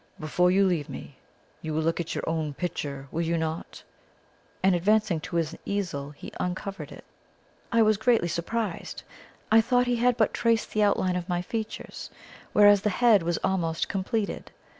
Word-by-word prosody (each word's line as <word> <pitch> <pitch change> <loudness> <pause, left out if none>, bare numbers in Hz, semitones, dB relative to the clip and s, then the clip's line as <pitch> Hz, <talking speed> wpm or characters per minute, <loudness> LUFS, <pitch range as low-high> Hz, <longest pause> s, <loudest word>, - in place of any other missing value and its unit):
Before 180 +3 +2
you 195 +2 +4
leave 170 -6 0
me, - - -9 0.4
you 155 -1 -4
will 160 - 0
look 165 +2 0
at 170 - -3
your - - -4
own 155 -3 -2
picture, 140 -5 -4
will 165 - -1
you 170 0 0
not?" 160 0 -4 0.8
and, 190 0 +5
advancing 190 -1 +2
to 165 - -7
his 165 -1 0
easel, 170 -9 -3
he 145 - -10
uncovered 195 +2 -4
it. - - -12 0.7
I 230 -1 +5
was 215 -1 +3
greatly 230 -7 +3
surprised. 175 +3 -3 0.5
I 225 +1 +7
thought 245 +2 +2
he 245 -1 +1
had 245 +1 +2
but 220 -3 +2
traced 230 -1 +1
the 215 - +1
outline 190 -3 +2
of 180 +1 -4
my 175 0 0
features, 220 +3 -5 0.4
whereas 205 -1 +6
the 210 - +1
head 220 0 +4
was 170 0 -1
almost 170 -4 0
completed. 205 +2 -2
185 Hz, 175 wpm, -27 LUFS, 165-215 Hz, 0.8 s, I